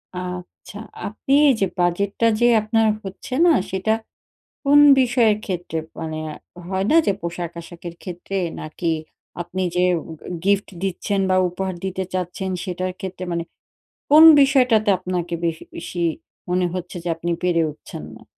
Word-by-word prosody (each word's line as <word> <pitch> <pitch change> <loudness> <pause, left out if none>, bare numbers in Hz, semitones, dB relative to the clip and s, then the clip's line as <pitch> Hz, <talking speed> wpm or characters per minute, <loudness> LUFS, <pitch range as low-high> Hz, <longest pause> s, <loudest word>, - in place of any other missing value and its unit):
আচ্ছা। 180 +3 -7 0.3
আপনি 220 +6 -3
এই 270 - +6
যে - - +5
বাজেটটা 200 +6 +1
যে 240 - +4
আপনার 220 +1 +2 0.2
হচ্ছে 195 +7 -8
না, 345 - +6 0.2
সেটা 190 +3 +1 0.7
কোন 285 +1 +6 0.2
বিষয়ের 240 -4 +3
ক্ষেত্রে? 175 -4 -4 0.2
মানে 160 -1 -4 0.5
হয় 190 +1 -1
না - - +5
যে, 200 - +3
পোশাক-আশাকের 170 0 -6
ক্ষেত্রে? 180 +1 -6 0.3
নাকি 165 +2 -3 0.5
আপনি 175 +2 -4
যে 180 - +3 0.2
ও - - -8 0.2
গ - - -34 0.2
গিফট 200 0 +2 0.2
দিচ্ছেন 195 +1 -1
বা 185 - +3
উপহার 185 +1 -4
দিতে 190 0 -2
চাচ্ছেন 185 +1 -3
সেটার 185 0 -3
ক্ষেত্রে? 185 -1 -6
মানে 170 0 -1 0.7
কোন 310 +2 +9 0.2
বিষয়টাতে 250 -6 +4
আপনাকে 180 -2 -3
বেশি 165 -1 -2
বেশি 175 - -6 0.5
মনে 180 0 +1
হচ্ছে 180 0 -5
যে - - -2
আপনি 170 +1 -3
পেরে 175 -2 +2
উঠছেন 150 - -10
না? - - -14
185 Hz, 145 wpm, -22 LUFS, 175-205 Hz, 0.7 s, কোন